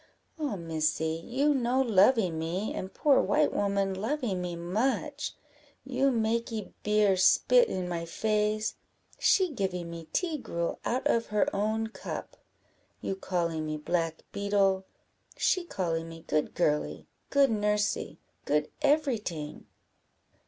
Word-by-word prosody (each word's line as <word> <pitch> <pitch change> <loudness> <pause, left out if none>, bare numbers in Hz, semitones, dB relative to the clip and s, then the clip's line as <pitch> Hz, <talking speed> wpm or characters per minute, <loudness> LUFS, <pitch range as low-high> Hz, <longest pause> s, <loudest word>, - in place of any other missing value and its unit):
"Ah, 290 -9 -1
Missy! 160 -1 -1
you 280 +5 +2
no 255 -1 +1
lovee 220 -4 +4
me, 165 +6 -2
and 190 - -5
poor 285 -3 +4
white 300 0 +2
woman 200 -1 +1
lovee 225 +3 -1
me 180 -1 -3
much. 240 - -1 0.5
You 265 +1 +2
makee 225 -2 -1
beer 210 -2 +3
spit 485 - +5
in 185 -1 -2
my 170 -1 -3
face 215 +4 0 0.5
she 375 -4 +4
givee 190 -8 -2
me 170 -1 -8
tea 325 - -1
gruel 170 -7 -3
out 255 +2 -1
of 230 0 +2
her 210 -1 +1
own 215 +2 0
cup. 220 - -7 0.6
You 195 - -3
callee 170 -4 -1
me 155 0 -3
black 165 +1 -1
beetle 200 -2 +1 0.5
she 370 - +2
callee 165 - -2
me 165 0 -10
good 155 -1 0
girly, 150 -4 0 0.2
good 280 -3 +4
nursy, 210 -7 0 0.3
good 150 +1 +1
every 290 -4 +3
ting." 155 -7 -6
205 Hz, 130 wpm, -29 LUFS, 170-240 Hz, 0.6 s, spit